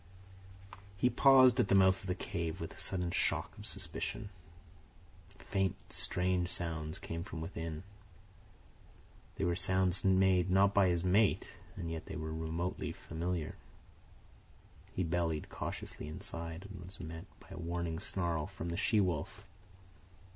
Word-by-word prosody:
He 125 +5 +3
paused 130 -2 +7
at 120 - +4
the 100 - +4
mouth 95 -1 +5
of 95 - -9
the 90 - 0
cave 85 -2 -3
with 80 - -5
a - - -13
sudden 90 -2 -1
shock - - +1
of - - -4
suspicion. 105 -3 -2 1.1
Faint, 95 -2 0 0.2
strange 90 0 0
sounds 80 -3 -2
came 85 0 -5
from 90 -4 -6
within. 80 0 -5 1.5
They - - -2
were 85 0 +2
sounds 95 0 +2
not 95 -1 +5
made 95 +1 +4
by 100 -2 +5
his 85 -1 +1
mate, 100 +3 +3 0.3
and 85 -1 -4
yet 80 -1 -5
they 95 - -5
were 80 -2 -4
remotely 80 +3 -2
familiar. 85 0 -3 1.4
He 95 - +1
bellied 80 -2 0
cautiously - - -5
inside 85 +3 -6
and 95 -3 -9
was 95 +3 -10
met 80 0 -7
by - - -18
a - - -7
warning 85 -1 -2
snarl 85 -5 -1
from 90 -3 -6
the 85 - -2
she 110 +2 +3
wolf. 90 -7 -1
90 Hz, 145 wpm, -34 LUFS, 80-95 Hz, 1.5 s, paused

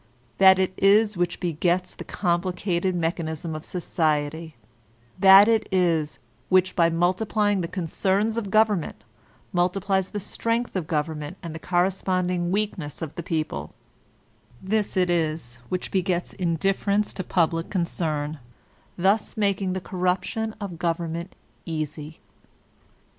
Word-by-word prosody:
This 190 -1 +8
it 185 0 0
is 210 +2 +4
which 175 0 -1
begets 175 +1 0
the - - -8
complicated 180 0 -1
mechanism 165 -1 -2
of 155 0 -6
society; 160 -3 -1 0.6
this 195 +1 +9
it 220 -2 +2
is 170 -5 +1 0.3
which, 185 0 +3
by 170 -1 +4
multiplying 195 +4 +1
the 170 - -2
concerns 195 +5 0
of 225 -4 -3
government, 210 -4 +1 0.5
multiplies 190 +2 +1
the 210 - -4
strength 230 +4 -2
of 180 -5 -2
government 150 +1 -3
and 165 -2 -6
the 160 - -7
corresponding 180 0 0
weakness 180 -7 -2
of 155 - -6
the - - -5
people; 155 - -3 0.8
this 210 +1 -1
it 180 -1 +3
is 155 -7 -1
which 185 - -3
begets 180 -2 -1
indifference 195 +4 0
to 185 - -4
public 165 -2 0
concern, 155 -5 -2 0.6
thus 195 +5 +1
making 195 -3 +1
the 190 - -2
corruption 185 +5 -1
of 190 -5 -6
government 170 +1 -2 0.3
easy. 155 -1 -5
180 Hz, 125 wpm, -25 LUFS, 165-195 Hz, 0.8 s, this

